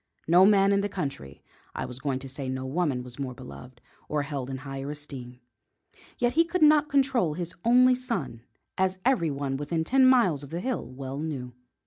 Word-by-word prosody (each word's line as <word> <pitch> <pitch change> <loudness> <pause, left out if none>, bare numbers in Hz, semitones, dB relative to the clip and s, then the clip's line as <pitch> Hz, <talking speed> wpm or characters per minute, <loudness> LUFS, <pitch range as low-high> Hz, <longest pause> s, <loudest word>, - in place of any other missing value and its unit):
No 180 +4 +7
man 200 -1 +5
in 200 0 +3
the 205 - -2
country 75 - -6 0.3
I - - -3
was 125 0 -7
going 135 -1 -1
to 135 - -7
say 130 0 -5
no 130 0 -3
woman 135 -3 -1
was 125 +1 -11
more 130 -2 -4
beloved, 115 - -12 0.3
or 150 -1 0
held 140 -3 -5
in 135 - -4
higher 135 0 -5
esteem. 135 -4 -8 0.8
Yet 240 0 +1
he 330 +4 +5
could 340 0 0
not 300 0 +5
control 265 - +2
his 175 0 -4
only 250 +2 +6
son, 235 - -3 0.4
as 190 0 +1
everyone 145 - +1
within 160 +3 -2
ten 260 +8 +4
miles 195 - +4
of 140 - -9
the 165 +3 -4
hill 255 +6 -3
well 135 +2 -6
knew. 135 -6 -5
150 Hz, 190 wpm, -27 LUFS, 130-215 Hz, 0.8 s, No